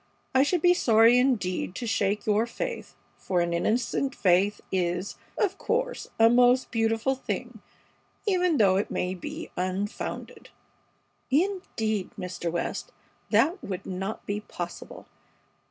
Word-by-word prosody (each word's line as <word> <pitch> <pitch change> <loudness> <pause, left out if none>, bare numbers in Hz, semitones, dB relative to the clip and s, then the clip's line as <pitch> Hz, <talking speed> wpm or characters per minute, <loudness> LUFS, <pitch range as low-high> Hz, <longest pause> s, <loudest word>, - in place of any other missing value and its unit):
I 260 - +5
should 315 +4 +1
be 355 0 +7
sorry 230 -5 +5
indeed 195 -8 0
to 245 - -4
shake 210 -2 0
your 215 +2 +2
faith, 475 - -5 0.2
for 180 -2 0
an 170 0 0
innocent 245 +8 0
faith 190 +2 +3
is, 180 0 -1 0.2
of 390 -2 0
course, - - -1
a 225 - +8
most 245 +2 +4
beautiful 225 +2 +1
thing, 265 - -5 0.6
even 360 -5 +2
though 195 -4 +4
it 200 - -1
may 180 +1 -1
be 180 - -7
unfounded." 185 +3 -4 0.8
"Indeed, 265 - 0
Mr. 175 -3 -4
West, 170 - -3 0.4
that 360 +4 +2
would 190 0 -5
not 190 +3 -4
be 205 +1 -2
possible. 175 -4 -8
220 Hz, 130 wpm, -27 LUFS, 185-265 Hz, 0.8 s, a